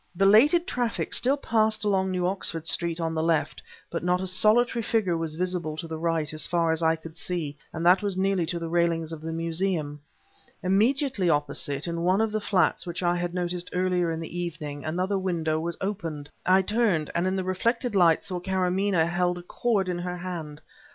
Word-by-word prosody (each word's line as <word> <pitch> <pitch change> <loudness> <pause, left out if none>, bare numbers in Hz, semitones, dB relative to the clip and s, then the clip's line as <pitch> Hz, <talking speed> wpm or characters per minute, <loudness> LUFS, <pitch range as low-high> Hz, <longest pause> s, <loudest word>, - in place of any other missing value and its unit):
Belated 235 - +5
traffic 245 -10 -2
still 270 +3 +3
passed 220 -5 +1
along 190 -2 +1
New 180 -1 -1
Oxford 180 -3 -1
Street 170 0 -1
on 165 -1 -1
the 160 - -1
left, 165 -1 0 0.3
but 165 - -3
not 180 +1 +2
a 190 - -3
solitary 220 +5 +3
figure 215 -6 0
was 165 -2 -3
visible 175 -3 -2
to 165 - -5
the 160 -1 -5
right, 160 -2 -1
as 155 - -1
far 170 -1 +1
as 160 +1 0
I 160 0 +3
could 160 0 -12
see, 165 -5 -3 0.2
and 165 +1 -4
that 180 +3 +6
was 200 -3 -2
nearly 190 -3 +1
to 170 +1 -2
the 165 -1 -4
railings 165 -1 0
of 160 -2 -7
the 160 +1 -5
Museum. 165 -2 -2 0.6
Immediately 220 - +2
opposite, 145 -1 +1
in 170 -1 -3
one 185 +3 +2
of 220 -1 +1
the 215 0 -2
flats 185 -3 +1
which 175 +2 -4
I 175 0 +2
had 175 0 -3
noticed 180 0 -2
earlier 180 -2 +1
in 160 - -3
the 170 +2 -6
evening, 150 -4 -5
another 185 +5 -1
window 165 -4 -1
was 170 +1 -4
opened. 165 -7 -4 0.2
I 190 +1 +5
turned, 205 -7 +1
and 170 +2 0
in 190 - 0
the 190 - -1
reflected 230 +6 -1
light 170 -4 +4
saw 180 -2 -3
that 180 - -14
Karamaneh 185 -2 +1
held 175 +1 0
a 175 - -9
cord 200 +1 0
in 180 -1 -2
her 180 0 -4
hand. 165 -4 -6
175 Hz, 205 wpm, -26 LUFS, 165-190 Hz, 0.6 s, that